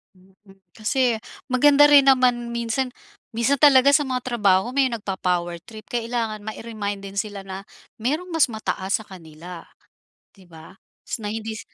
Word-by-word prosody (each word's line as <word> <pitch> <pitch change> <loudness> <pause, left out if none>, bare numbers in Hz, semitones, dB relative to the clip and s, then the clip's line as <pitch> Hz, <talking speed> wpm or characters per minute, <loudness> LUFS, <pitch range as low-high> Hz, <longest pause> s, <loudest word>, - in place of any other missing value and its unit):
Mm, 185 +1 -24 0.4
kasi 225 +1 0 0.2
maganda 285 +3 +5
rin 290 -1 +7
naman 245 -2 +2
minsan 235 +2 -2 0.4
minsan 235 +5 +1
talaga 280 -1 +7
sa 295 - +4
mga 255 -3 -4
trabaho, 220 -1 +1
may 270 -2 +2
nagpo-power 180 -6 -2
trip. 215 0 -13
Kailangan 230 -3 -3
mai-remind 215 -2 -5
din 195 - -10
sila 200 -1 -4
na 190 0 -7 0.4
merong 300 +9 -1
mas 315 -6 +3
mataas 205 -3 -2
sa 220 - -11
kanila 170 -1 -11 0.7
'di 190 -3 -21
ba. 165 +2 -15 0.2
S - - -5
na 210 - -5
hindi 220 +1 -5
225 Hz, 150 wpm, -23 LUFS, 195-255 Hz, 0.7 s, rin